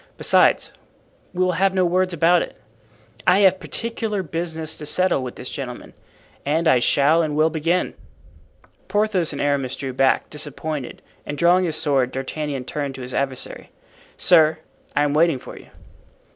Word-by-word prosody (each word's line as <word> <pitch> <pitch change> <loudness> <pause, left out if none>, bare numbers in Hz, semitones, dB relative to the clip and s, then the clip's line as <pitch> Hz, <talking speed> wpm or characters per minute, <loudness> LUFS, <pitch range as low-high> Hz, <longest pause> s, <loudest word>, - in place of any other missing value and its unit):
Besides, - - +3 0.6
we 185 0 0
will 185 - +2
have 190 +2 +1
no 185 -1 +3
words 185 +1 +1
about 170 +1 +3
it. - - -7 0.7
I 195 - +5
have 190 -1 +4
particular 225 -3 -3
business 160 -1 -4
to 150 - -7
settle 185 -2 +1
with 125 -1 -6
this 125 - -7
gentleman 125 -3 -7 0.5
and 160 +4 0
I 130 -5 +5
shall 145 +6 +3
and 155 -2 -2
will 155 +1 +3
begin." 165 +3 0 0.9
Porthos 200 -4 +1
and 140 - -6
Aramis 140 -3 0
drew 135 -1 -5
back, 135 +1 +2
disappointed, 150 -2 -5 0.2
and 145 - -6
drawing 175 +4 +4
his 160 -3 -1
sword 140 -5 +1
D'Artagnan 135 0 -4
turned 140 0 -4
to 130 - -8
his 125 0 -7
adversary: 135 -2 -3 0.5
"Sir, 160 -3 +5 0.4
I 145 - +3
am 145 -1 0
waiting 160 -1 +3
for - - -11
you." - - -13
155 Hz, 160 wpm, -22 LUFS, 140-180 Hz, 0.9 s, I